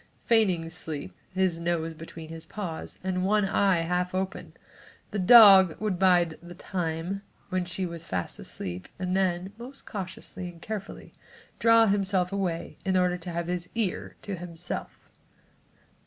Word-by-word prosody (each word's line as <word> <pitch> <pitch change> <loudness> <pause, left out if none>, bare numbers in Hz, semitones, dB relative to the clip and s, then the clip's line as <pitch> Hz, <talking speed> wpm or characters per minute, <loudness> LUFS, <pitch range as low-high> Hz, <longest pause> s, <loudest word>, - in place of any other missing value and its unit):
Feigning 190 -8 +3
sleep, 155 -4 -5 0.2
his 185 -3 +1
nose 170 -1 -1
between 160 0 -10
his 165 0 -8
paws 180 -5 -6
and 185 -1 -1
one 210 +1 +3
eye 195 -2 +3
half 180 +2 -1
open, 190 0 -3 0.6
the 210 - -2
dog 195 -4 +8
would 210 -5 -1
bide 175 -4 +3
the 175 +1 -11
time 175 +1 -3 0.3
when 185 -1 -1
she 180 +2 -3
was 170 -1 -7
fast 90 -2 -3
asleep 90 0 -6
and 185 0 -1
then, 190 0 0
most 260 +3 -10
cautiously 185 -2 -6
and 170 -1 -13
carefully, 205 +2 -7 0.5
draw 230 0 +6
himself 195 -3 +1
away 185 -4 -3
in 190 -1 +1
order 180 -1 +2
to 175 - -7
have 170 0 -2
his 180 0 -3
ear 220 -5 -1
to 200 - -4
himself. 175 -1 -6
180 Hz, 150 wpm, -27 LUFS, 170-195 Hz, 0.6 s, dog